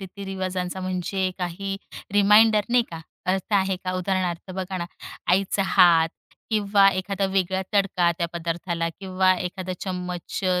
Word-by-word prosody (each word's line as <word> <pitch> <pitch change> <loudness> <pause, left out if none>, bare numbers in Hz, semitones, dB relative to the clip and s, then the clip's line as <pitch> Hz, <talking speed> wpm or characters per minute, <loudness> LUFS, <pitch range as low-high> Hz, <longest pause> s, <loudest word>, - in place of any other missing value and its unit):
रीती-रिवाजांचा, 190 -1 -4
म्हणजे 185 +1 -1
काही 190 +2 -3 0.4
रिमाइंडर 210 +1 +6
नाही 245 0 +4
का 165 -1 -7 0.3
अर्थ 190 +2 -2
आहे 190 -1 +2
का? 185 - -1
उदाहरणार्थ 185 -1 -2
बघा 190 0 -4
ना, 170 - -2 0.5
आईचा 195 +2 +2
हात 170 -4 +5 0.4
किंवा 200 -2 +4
एखादा 195 +1 -2
वेगळा 190 0 +1
तडका 185 -3 +3
त्या 170 - 0
पदार्थाला, 170 0 -2
किंवा 185 -1 +2
एखादा 185 +1 -4
चम्मच 180 -2 -4
अ, 180 -1 +2
185 Hz, 135 wpm, -24 LUFS, 180-195 Hz, 0.5 s, रिमाइंडर